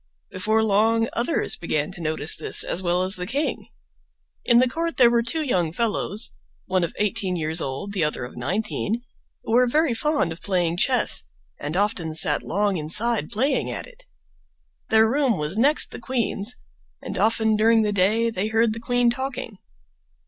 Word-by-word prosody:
Before 215 +4 +1
long 225 +2 +2
others 245 +8 0
began 155 -3 -2
to 175 - -10
notice 155 -1 0
this - - +1
as 180 - -1
well 180 0 0
as 185 +1 +3
the 180 0 -5
king. 280 +8 -2 0.8
In 240 - +4
the 255 +1 +5
court 330 +6 -3
there 240 -2 +6
were 235 0 +3
two 310 +7 -1
young 180 - 0
fellows, 215 +1 -1 0.3
one 185 -1 0
of 170 - -4
eighteen 195 -3 -1
years 160 0 +1
old, 135 +10 -5
the 185 -5 0
other 150 -5 -2
of 125 - -11
nineteen, 210 - -2 0.4
who - - -5
were 250 +1 +5
very 300 +1 +2
fond 290 - 0
of 165 - -8
playing 175 -3 0
chess - - +2 0.3
and 150 +4 -4
often 190 -6 -1
sat - - +4
long 200 0 -1
inside 180 +4 +1
playing 260 +7 0
at - - -5
it. - - -17 0.8
Their 220 0 +5
room 260 -3 +1
was 150 +8 -2
next 290 +5 +3
the - - -7
queen's, 235 -2 -2 0.5
and - - -6
often 220 0 +2
during 225 +1 +4
the 210 -1 0
day 215 +4 +2
they 200 0 -2
heard 225 0 +2
the 225 - -6
queen 245 0 +1
talking. 250 -5 -5
215 Hz, 180 wpm, -23 LUFS, 180-235 Hz, 0.8 s, there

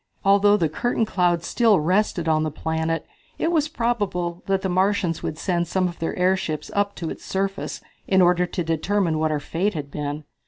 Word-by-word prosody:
Although 200 +1 +5
the 165 - +2
cloud 225 +9 0
curtain 175 -2 +2
still 225 0 +3
rested 180 +1 +1
on 155 -1 +3
the 155 - 0
planet 160 +2 -2 0.3
it 330 - 0
was 310 -3 +2
probable 205 - -2
that 195 -1 +1
the - - +1
Martians 185 -2 +1
would 155 - -4
send 175 -1 -1
some 185 +1 +1
of 175 - -8
their 165 - -2
airships 180 -4 0
up 200 0 0
to 165 -2 -4
its - - -8
surface 195 0 -3 0.3
in 190 - +3
order 180 0 +4
to 175 - -3
determine 165 +1 0
what 155 0 +1
our 150 -1 0
fate 180 +7 -1
had 145 -2 -5
been. 150 +1 -4
180 Hz, 195 wpm, -23 LUFS, 160-200 Hz, 0.3 s, Although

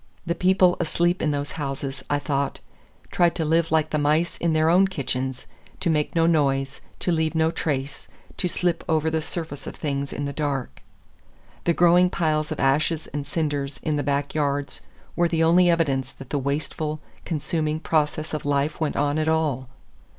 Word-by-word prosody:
The 170 - 0
people 185 0 +3
asleep 175 +2 +1
in 155 - +1
those 145 -1 -2
houses, 135 -2 -4
I 145 - +2
thought, 140 -1 -1 0.5
tried 175 -2 +3
to 165 - -1
live 165 +1 +2
like 155 -1 +2
the 150 - +1
mice 155 +4 +2
in 170 -1 0
their 155 0 +3
own 185 +4 +5
kitchens; 130 -6 -3 0.3
to 180 -3 +1
make 150 0 0
no 165 -1 +4
noise, 135 -4 +1 0.2
to 180 - +1
leave 160 -1 0
no 160 0 +3
trace, 140 -4 -3 0.3
to 180 - 0
slip 175 -1 0
over 160 0 +2
the 160 0 0
surface 160 -2 -5
of - - -6
things 140 -2 -3
in 145 - -3
the 140 - -3
dark. 140 -3 -3 0.8
The 170 - +2
growing 175 +1 +5
piles 155 -3 0
of 155 - -3
ashes 150 +4 +2
and 145 -1 -3
cinders 145 -3 -2
in 155 - 0
the 145 - 0
back 140 0 -1
yards 145 -2 -1 0.3
were 175 0 +3
the 165 -1 +1
only 175 +2 +5
evidence 135 -6 +1
that 135 - -12
the 145 - +1
wasteful, 150 +2 -2 0.2
consuming 155 -1 -1
process 155 -1 0
of 155 - -3
life 145 +1 0
went 155 - 0
on 145 +2 +1
at 155 - 0
all. 150 -6 0
155 Hz, 185 wpm, -24 LUFS, 140-165 Hz, 0.8 s, own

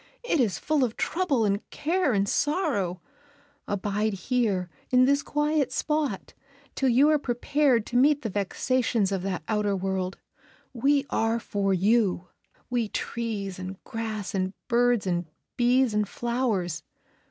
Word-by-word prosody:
It 475 -10 +1
is 215 -8 +2
full 300 -3 +1
of 230 -3 -2
trouble 300 -11 +1
and 200 0 +1
care 335 0 0
and 200 -2 +1
sorrow; 280 - 0 0.7
abide 205 +1 -1
here 195 -2 0 0.2
in 255 0 +5
this 280 +1 +3
quiet 295 -1 0
spot 300 -10 -1 0.4
till 270 - +1
you 260 +5 +5
are 305 - +3
prepared 255 -1 +1
to 245 - -1
meet 290 +3 +4
the 225 - -2
vexations 215 +1 0
of 195 -2 -1
that 190 -1 -3
outer 210 -2 +1
world. 190 0 -2 0.6
We 275 +3 +2
are 225 +1 +1
for 200 -3 -1
you, 190 -1 +2 0.4
we 240 -3 -1
trees 205 -6 -4
and 185 +1 -6
grass 220 -4 -4
and 190 -1 -1
birds 245 -2 +2
and 175 -2 -1 0.3
bees 245 -1 +3
and 210 -1 0
flowers. 230 - -1
230 Hz, 140 wpm, -26 LUFS, 195-265 Hz, 0.7 s, in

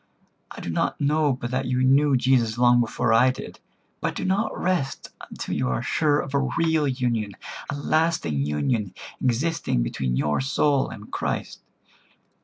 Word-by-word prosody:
I - - -9
do 85 - -4
not - - -1
know 150 0 +2
but 120 -1 -5
that 130 0 -1
you 125 0 +1
knew 135 +1 +4
Jesus 125 -3 +2
long 120 0 +5
before 120 0 0
I 125 +3 +5
did; 130 - -6 0.4
but - - -2
do - - -3
not 200 +4 0
rest 175 -7 -1 0.2
until - - -5
you 65 - 0
are 65 -1 -1
sure 150 -2 +2
of 135 - -5
a 140 -2 +1
real 160 -3 +2
union—a 120 -4 -3
lasting 145 - 0
union 90 - -1 0.3
existing 130 - 0
between 60 +1 -2
your 75 - +1
soul 135 +1 +1
and 105 0 -10
Christ. - - -3
130 Hz, 160 wpm, -24 LUFS, 110-145 Hz, 0.4 s, long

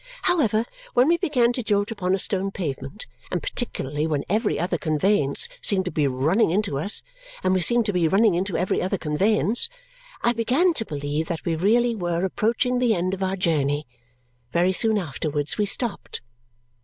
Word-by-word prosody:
However, 230 - +2 0.3
when 245 +3 +5
we 340 +1 +4
began 255 -10 +2
to 250 - -3
jolt 205 -1 0
upon 190 -4 0
a - - -2
stone 195 0 +1
pavement, 150 - -5 0.2
and - - -3
particularly 155 - -2
when 150 -3 -1
every 215 +3 0
other 175 -1 -1
conveyance 155 -1 +1
seemed 190 -2 +2
to 180 - -3
be 150 -2 +1
running 150 - +2
into 185 -6 0
us, 200 +8 +4 0.4
and 185 - +2
we 185 - +2
seemed 235 +6 +3
to 205 - -1
be 175 -2 +2
running 200 +4 +4
into 185 +2 -1
every 180 +2 0
other 190 +2 -1
conveyance, 200 +8 +1 0.5
I 240 - +3
began 255 +10 +2
to 225 -8 -2
believe 145 +1 -3
that 165 -3 -4
we 165 - 0
really 230 +8 +2
were 175 -3 -1
approaching 235 +6 0
the 240 -3 +2
end 180 +1 -1
of 195 - -5
our 190 0 0
journey. 150 -5 0 0.7
Very 175 +4 +2
soon 220 +3 +2
afterwards 150 -2 -3
we 205 - +2
stopped. 230 +2 -2
190 Hz, 180 wpm, -24 LUFS, 160-225 Hz, 0.7 s, when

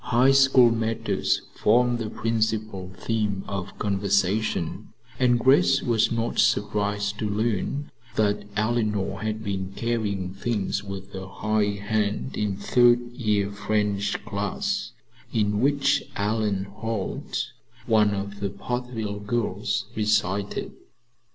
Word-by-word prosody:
High 125 +3 +4
School 135 -3 +6
matters 115 0 0
formed 120 +2 +3
the 110 -2 -3
principal 110 -4 -1
theme 105 -4 -1
of 100 -1 -5
conversation, 100 +1 0 0.3
and 125 -1 +4
Grace 135 +2 +4
was 115 -3 +2
not 115 0 -1
surprised 105 -1 +1
to 105 - -1
learn 110 +6 -1 0.2
that 105 -2 +1
Eleanor 105 -3 0
had 110 0 -3
been 95 -2 -3
carrying 105 -6 -1
things 100 0 -2
with 100 0 -8
a 95 0 -6
high 105 +1 0
hand 110 +3 0
in 100 -2 -1
third 120 +3 +3
year 105 -4 0
French 100 -1 -1
class, - - -2 0.4
in 105 -2 +1
which 140 +2 +3
Ellen 105 -1 0
Holt, 110 0 -4 0.3
one 105 -4 +3
of 100 +1 -5
the 100 - -1
Portville 110 0 -4
girls, 115 +2 -1
recited. 105 -2 0
105 Hz, 115 wpm, -25 LUFS, 100-115 Hz, 0.4 s, School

